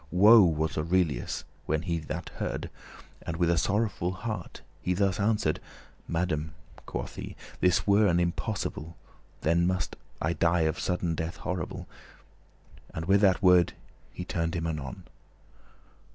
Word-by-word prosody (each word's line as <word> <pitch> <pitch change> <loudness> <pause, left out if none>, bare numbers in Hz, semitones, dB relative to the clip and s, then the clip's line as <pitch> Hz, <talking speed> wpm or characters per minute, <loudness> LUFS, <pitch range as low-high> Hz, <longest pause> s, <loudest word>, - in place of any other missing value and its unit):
Woe 105 +5 +8
was 80 -3 +1
Aurelius 80 -5 0 0.2
when 80 0 +1
that - - -10
he 85 -1 0
this 80 - -5
heard, - - -3 0.5
And 85 -1 -4
with 85 -1 +3
a 85 - +2
sorrowful 100 -2 0
heart 110 +4 -5 0.2
he 90 - 0
thus 95 -1 +1
answer'd. 105 +1 +1 0.5
"Madame, 80 -2 -1 0.3
quoth - - -5
he, - - -6 0.2
"this 90 -1 +3
were 105 +1 +5
an 85 -2 +3
impossible. 85 -2 -2 0.4
Then 85 +3 +3
must 90 -6 -1 0.2
I 85 +2 0
die 85 0 +2
of 80 -1 0
sudden 90 -2 0
death 80 +1 -3
horrible." 90 -3 -4 1.1
And 80 - -3
with 100 +3 +4
that 95 -2 +4
word 90 -2 +6 0.4
he 90 - -6
turned 85 -1 -1
him 85 -1 -1
anon. 75 -6 -4
85 Hz, 145 wpm, -28 LUFS, 80-95 Hz, 1.1 s, Woe